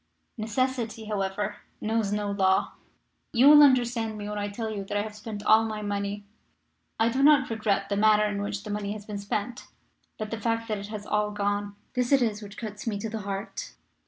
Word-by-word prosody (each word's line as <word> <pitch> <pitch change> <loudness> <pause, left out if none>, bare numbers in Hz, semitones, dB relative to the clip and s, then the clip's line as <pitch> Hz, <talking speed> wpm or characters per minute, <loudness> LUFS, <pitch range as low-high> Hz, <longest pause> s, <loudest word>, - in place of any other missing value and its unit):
Necessity, 230 0 -2
however, 205 0 -2 0.2
knows 220 -2 0
no 205 -1 -1
law. 190 -1 +2 0.6
You 245 +4 +6
will 295 0 +10
understand 240 -5 +3
me 205 0 -5
when 210 0 -3
I 205 - -1
tell 220 +2 -4
you 205 -2 -4
that 205 - -2
I 205 - +1
have 215 -1 -7
spent 210 -1 -7
all 220 +1 +6
my 215 -1 -4
money. 205 0 -3 0.7
I 225 +1 +4
do 260 +3 0
not 280 -3 +5
regret 210 -3 0
the 200 - -1
manner 210 0 +5
in 205 -1 -2
which 205 0 -3
the 210 - -6
money 205 0 -2
has 210 -1 -9
been 210 -1 -5
spent, 205 +4 -4 0.5
but 215 -1 -5
the 225 -1 -4
fact 230 +1 0
that 210 -2 -1
it 200 - -7
has 210 -1 -6
all 210 0 +1
gone. 205 0 -2 0.2
This 250 0 0
it 275 -3 +5
is 215 -2 -1
which 205 -1 -10
cuts 215 -1 -7
me 210 -3 0
to 220 +2 -4
the 225 - -3
heart. 200 - -5
210 Hz, 215 wpm, -27 LUFS, 205-225 Hz, 0.7 s, will